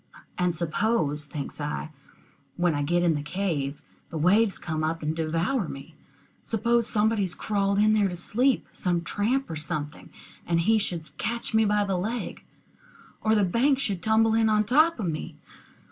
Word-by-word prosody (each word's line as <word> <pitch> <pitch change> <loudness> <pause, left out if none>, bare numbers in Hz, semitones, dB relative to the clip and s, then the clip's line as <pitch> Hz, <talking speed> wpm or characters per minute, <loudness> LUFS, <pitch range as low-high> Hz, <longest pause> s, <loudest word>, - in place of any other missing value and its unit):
And 180 -1 0
suppose, 155 -2 0
thinks 145 0 -6
I, 150 +1 -4 0.7
when 175 -1 +2
I 145 - -1
get 175 +4 +1
in 170 -2 +3
the 145 - -2
cave, 150 -4 -3 0.3
the 165 - -5
waves 195 +6 +3
come 155 -2 -3
up 160 +1 -2
and 155 +1 -1
devour 165 +8 0
me? 140 +4 -9 0.5
Suppose 235 +1 +1
somebody 220 0 +2
has 185 -3 -2
crawled 200 -1 0
in 215 +1 +4
there 210 -2 +3
to 180 - -5
sleep, 245 +9 +1
some 175 -2 -1
tramp 245 +10 0
or 165 - -5
something, 150 -1 -4 0.3
and 170 -1 +1
he 220 +5 +3
should 165 -7 -4
catch 235 +1 -2
me 220 0 +4
by 210 0 +2
the 195 -2 -1
leg? 225 +6 -4 0.8
Or 220 0 +3
the 210 - +3
bank 245 +9 +2
should 200 -9 -1
tumble 220 0 +3
in 225 0 +3
on 215 0 +3
top 310 +7 +3
of 210 - -2
me? 155 -2 -4
190 Hz, 175 wpm, -26 LUFS, 160-220 Hz, 0.8 s, in